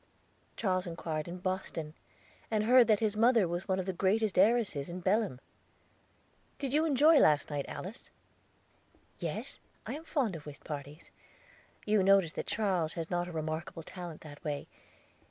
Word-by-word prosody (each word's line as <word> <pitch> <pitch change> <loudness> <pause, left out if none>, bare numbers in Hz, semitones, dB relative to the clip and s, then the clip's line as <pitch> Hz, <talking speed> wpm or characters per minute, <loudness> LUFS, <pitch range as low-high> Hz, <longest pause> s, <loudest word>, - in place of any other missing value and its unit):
"Charles 185 -4 0
inquired 165 -2 -4
in 175 +1 -6
Boston, 180 -4 -3 0.6
and 215 -1 +1
heard 245 +2 +6
that 215 -2 +3
his 215 -1 +1
mother 230 -3 +4
was 175 +2 -4
one 190 -1 +1
of 185 - -2
the 190 - -2
greatest 195 +3 +1
heiresses 200 -9 +3
in 175 +1 -5
Belem." 195 - +1 1.2
"Did 275 -2 -3
you 310 +2 +3
enjoy 305 +1 +6
last 150 0 +4
night, 145 -1 -2
Alice?" 200 +6 -8 1.1
"Yes, - - -4 0.3
I - - -4
am 310 - -6
fond 265 - -1
of 150 -2 -9
whist 140 -2 -10
parties. 145 +1 -8 0.7
You 210 -1 +3
noticed 190 -4 +4
that - - -3
Charles 185 -7 0
has 165 0 -5
not 175 0 0
a - - -7
remarkable 160 +1 -4
talent 175 -2 -8
that 145 0 -12
way. 145 -3 -3
185 Hz, 160 wpm, -31 LUFS, 160-215 Hz, 1.2 s, heard